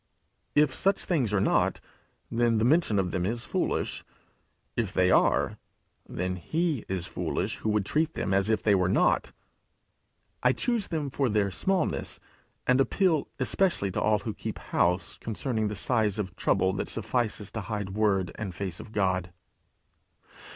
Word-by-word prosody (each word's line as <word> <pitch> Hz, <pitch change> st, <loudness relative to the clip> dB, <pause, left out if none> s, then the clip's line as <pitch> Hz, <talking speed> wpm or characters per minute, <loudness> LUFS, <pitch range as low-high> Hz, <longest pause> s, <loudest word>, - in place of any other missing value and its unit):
If 150 Hz, -2 st, +4 dB
such 195 Hz, 0 st, +1 dB
things 135 Hz, -, +1 dB
are 105 Hz, -, +2 dB
not, 95 Hz, -, +2 dB, 0.5 s
then 115 Hz, -1 st, +2 dB
the 110 Hz, -, +2 dB
mention 145 Hz, -6 st, +3 dB
of 95 Hz, -2 st, 0 dB
them 90 Hz, -, -1 dB
is 115 Hz, +5 st, -1 dB
foolish. -, -, -1 dB, 0.7 s
If -, -, -1 dB
they 90 Hz, 0 st, +3 dB
are, -, -, +3 dB, 0.5 s
then 90 Hz, +1 st, -2 dB
he 155 Hz, -, -1 dB
is 95 Hz, -2 st, -1 dB
foolish -, -, -2 dB
who 110 Hz, -, -2 dB
would 105 Hz, -2 st, +1 dB
treat 160 Hz, +7 st, 0 dB
them 95 Hz, -, -1 dB
as 100 Hz, +2 st, +2 dB
if 110 Hz, -2 st, +1 dB
they 105 Hz, -, +4 dB
were 90 Hz, -2 st, +2 dB
not. -, -, +2 dB, 1.1 s
I 125 Hz, 0 st, +4 dB
choose 235 Hz, -, 0 dB
them 150 Hz, -5 st, -3 dB
for 135 Hz, -1 st, +1 dB
their 105 Hz, -2 st, +1 dB
smallness, 185 Hz, -, -1 dB, 0.5 s
and 125 Hz, +1 st, +4 dB
appeal 165 Hz, 0 st, +2 dB
especially 130 Hz, -, +1 dB
to -, -, -2 dB
all 110 Hz, -1 st, +3 dB
who 105 Hz, +2 st, -5 dB
keep -, -, -5 dB
house 90 Hz, +1 st, 0 dB
concerning 110 Hz, 0 st, -2 dB
the 105 Hz, -, -3 dB
size 110 Hz, -1 st, +1 dB
of 95 Hz, -4 st, -4 dB
trouble 95 Hz, -1 st, +2 dB
that 95 Hz, -, -3 dB
suffices 110 Hz, -2 st, -1 dB
to 110 Hz, -, -4 dB
hide 105 Hz, -2 st, -4 dB
word 100 Hz, -3 st, +1 dB
and 100 Hz, -5 st, -6 dB
face 95 Hz, -4 st, -4 dB
of -, -, -10 dB
God. 95 Hz, -3 st, 0 dB
105 Hz, 165 wpm, -28 LUFS, 95-130 Hz, 1.1 s, If